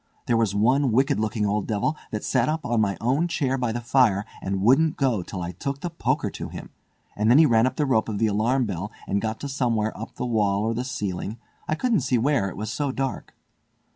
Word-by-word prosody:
There 120 - +2
was 110 -3 +1
one 125 +5 +3
wicked 130 -1 +2
looking 110 0 -1
old 105 0 0
devil 110 +8 0
that 105 - -4
sat 125 0 +1
up 155 +1 -2
on 120 -2 +1
my 100 -2 0
own 135 +9 +1
chair 140 -6 0
by 125 -3 -1
the 120 +2 -3
fire, 120 -5 +3 0.2
and 95 0 -2
wouldn't 145 +7 +4
go 125 -8 +1
till 90 +1 -6
I 85 - -4
took 140 +8 -5
the 175 - -3
poker 165 - -1
to - - -6
him, - - -9 0.4
and 105 +2 +1
then 125 - +7
he 160 - +7
ran 115 -2 +4
up 130 - -3
the 150 - +1
rope 120 -5 +1
of 105 - -2
the 115 - +2
alarm 115 +5 +1
bell 100 +1 -4 0.2
and 100 +1 0
got 110 0 -3
to 145 - -3
somewhere 120 -6 0
up 115 - -8
the 125 - -3
wall 105 -4 +1
or 115 +1 0
the 120 +2 -2
ceiling—I 110 +3 -5
couldn't 235 +4 +1
see 125 - +1
where, 125 -4 +1
it - - -9
was 110 +1 -4
so 140 +3 -1
dark." 135 0 -4
115 Hz, 235 wpm, -24 LUFS, 105-135 Hz, 0.4 s, then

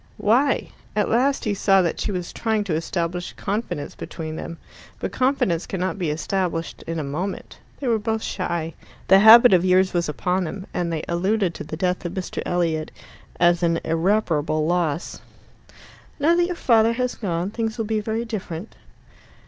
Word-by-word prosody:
Why? 235 +7 +2 0.3
At 210 -1 +1
last 265 +5 +2
he 210 - +1
saw 195 -1 +3
that 170 - -1
she - - -1
was 180 -2 -4
trying 220 -2 0
to 190 -5 -3
establish 170 +2 -2
confidence 200 -9 -3
between 155 -1 -6
them. 165 +1 -6 0.4
But - - -3
confidence 255 -10 +1
cannot 185 +1 -2
be 170 -4 -1
established 165 +2 -2
in 165 0 -3
a 155 - -2
moment. 170 +8 -5 0.2
They 275 - -3
were 230 -2 +2
both 220 +1 -2
shy. 165 -1 -3 0.4
The 190 - +8
habit 230 +2 +9
of 180 -1 +4
years 185 0 +3
was 170 -3 0
upon 180 +5 -1
them, 190 +4 -6
and 170 -1 -1
they 160 -2 -3
alluded 190 +2 0
to - - -7
the 155 - -7
death 180 +1 -1
of 175 - -5
Mr. 190 -1 -4
Elliot 165 -3 0 0.5
as 175 0 +4
an 165 -1 +2
irreparable 165 -3 +1
loss. 170 -2 -1 1.0
"Now 320 +4 +4
that 345 0 +2
your 355 - -3
father 230 -6 +3
has 250 +1 -1
gone, 180 -2 -3
things 225 0 -3
will 225 - -1
be 215 0 0
very 220 +2 -2
different." 200 -4 -6
185 Hz, 175 wpm, -23 LUFS, 170-220 Hz, 1.0 s, habit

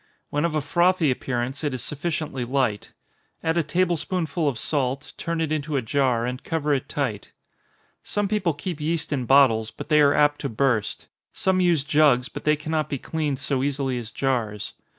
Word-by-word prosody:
When 145 +2 +1
of 165 -2 -1
a 155 - +1
frothy 175 0 +3
appearance, 125 +2 -3
it 145 -3 -1
is 125 - -4
sufficiently 150 -3 -3
light. 125 -4 -1 0.5
Add 160 0 +1
a 170 - +3
table 175 +3 +1
spoonful 165 -2 -1
of 135 -5 0
salt, 135 0 -1
turn 165 0 -3
it 160 -2 -1
into 155 -1 -1
a 135 - +2
jar, 125 -1 +1
and 125 +1 -4
cover 150 -3 0
it 135 - -2
tight. 125 -8 -3 0.7
Some 205 -1 -1
people 190 -6 0
keep 165 0 -5
yeast 155 0 -1
in 130 -3 -1
bottles, 115 -5 +5
but - - -9
they 150 0 +5
are 145 -1 +5
apt 145 0 +3
to 140 - -2
burst 110 -3 0 0.3
some 190 -1 +1
use 170 -5 +3
jugs, 145 -4 +3
but - - -8
they 150 0 +4
cannot 155 0 -2
be 140 - -2
cleaned 150 0 -2
so 140 -1 -1
easily 135 -2 -1
as 115 -1 -8
jars. 115 -6 -2
145 Hz, 190 wpm, -24 LUFS, 130-160 Hz, 0.7 s, bottles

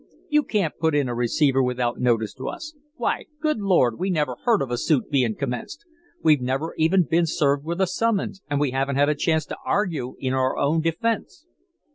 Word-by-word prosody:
"You 300 0 +4
can't 200 - -1
put 160 -2 +1
in 145 -3 +2
a 120 - -2
receiver 135 +3 +2
without 125 -1 -1
notice 115 -4 +1
to 130 +1 -7
us. 310 0 -7 0.2
Why, - - -1
good 305 -5 0
Lord! 175 - +2
we 190 - -1
never 155 -5 0
heard 230 - +3
of 130 - -6
a 120 - 0
suit 155 -4 0
being 125 -6 +2
commenced. 140 - -5 0.4
We've 150 -4 +4
never 135 +6 -2
even 175 +4 +4
been 170 +1 +2
served 145 -2 +1
with 170 +3 -4
a 190 - +4
summons 205 -1 -1
and 145 -1 0
we 145 -3 +1
haven't 135 +1 -1
had 145 +1 +3
a 150 - +1
chance 160 0 +1
to - - -7
argue 165 -11 -1
in 130 -1 -2
our 130 0 +1
own 155 +3 +2
defence." 225 - -2
150 Hz, 205 wpm, -24 LUFS, 130-180 Hz, 0.4 s, You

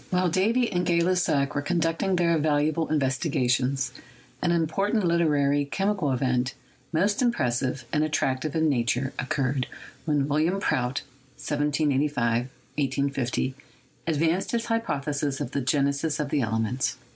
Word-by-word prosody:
While 180 -1 +2
Davy 220 +8 +2
and 180 -1 0
Gay 170 -1 +2
Lussac 170 -6 +1
were 145 - -1
conducting 165 +4 0
their 170 -1 +3
val 150 -1 +2
uable 155 +2 0
investigations, 135 -3 +1 0.5
an 175 - +2
important 195 +6 +1
literary 145 -4 +2
chemical 195 -1 0
event, 125 0 0 0.4
most 200 - +1
impressive 130 - 0
and 150 - +3
attractive 145 -1 -1
in 160 0 +3
nature, 125 -1 0
occurred 130 0 -1 0.4
when 145 -3 +1
William 155 +6 +1
Prout 130 -8 0 0.3
(1785 145 -5 0 0.3
1850) 135 -2 0 0.5
advanced 165 +6 +1
his 230 0 0
hypothesis 150 - -1
of 120 - -4
the 140 - -1
genesis 140 +3 0
of 145 -2 -2
the 145 - +2
elements. 115 +2 -1
145 Hz, 130 wpm, -26 LUFS, 135-170 Hz, 0.5 s, their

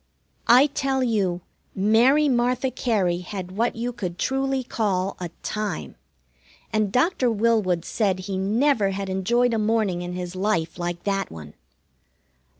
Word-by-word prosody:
I 250 +4 +7
tell 270 -2 -1
you, 195 -7 0 0.3
Mary 235 +9 +4
Martha 250 0 +1
Cary 190 -10 0
had 185 0 -6
what 225 +5 0
you 240 +2 -3
could 180 -7 -5
truly 270 0 0
call 195 -5 -1
a 175 -1 -4
Time. 205 - -3 0.8
And 215 -2 +1
Doctor 255 - +2
Willwood 210 -6 +1
said 195 -4 0
he 195 +1 -4
never 215 +3 +2
had 195 0 -4
enjoyed 235 +6 +1
a 225 - +1
morning 215 -4 +1
in 175 0 -5
his 180 0 -5
life 185 -4 -1
like 175 0 -3
that 195 -1 -1
one. 75 -2 -10
210 Hz, 145 wpm, -24 LUFS, 185-240 Hz, 0.8 s, I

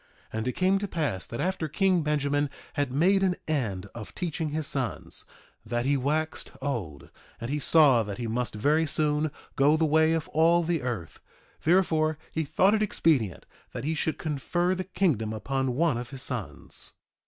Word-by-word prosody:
1:9 - - -2
And 110 - -3
it - - +2
came 190 +1 +2
to 205 - -3
pass 145 - -2
that 115 - -6
after 185 -3 -1
king 185 +3 +2
Benjamin 145 -1 +1 0.2
had 145 -3 -1
made 185 +8 +3
an 185 -2 +2
end 110 -12 -1
of 110 -3 -9
teaching 165 -3 -2
his 155 +1 -2
sons, 120 - -2 0.4
that 120 +2 -2
he 140 +1 +3
waxed 150 +3 -1
old, 110 - -4 0.3
and 115 +3 -4
he 150 - 0
saw 145 -6 +5
that 105 -2 -5
he 120 - -4
must 120 +1 -2
very 150 +9 +2
soon 150 +1 +1 0.3
go 145 +3 +4
the 160 - +2
way 160 +1 +4
of 160 -1 -1
all 165 +2 +4
the 165 -2 0
earth; 115 -10 -4 0.5
therefore, 160 -3 +3
he 160 - -1
thought 190 +8 +3
it 215 - +2
expedient 145 - +1 0.3
that 120 - -5
he 155 +3 0
should 160 0 -1
confer 175 +4 0
the 185 0 -3
kingdom 140 - 0
upon 130 +3 -1
one 155 -4 +2
of 120 0 -6
his 130 0 -5
sons. 105 - -4
150 Hz, 185 wpm, -27 LUFS, 120-160 Hz, 0.5 s, saw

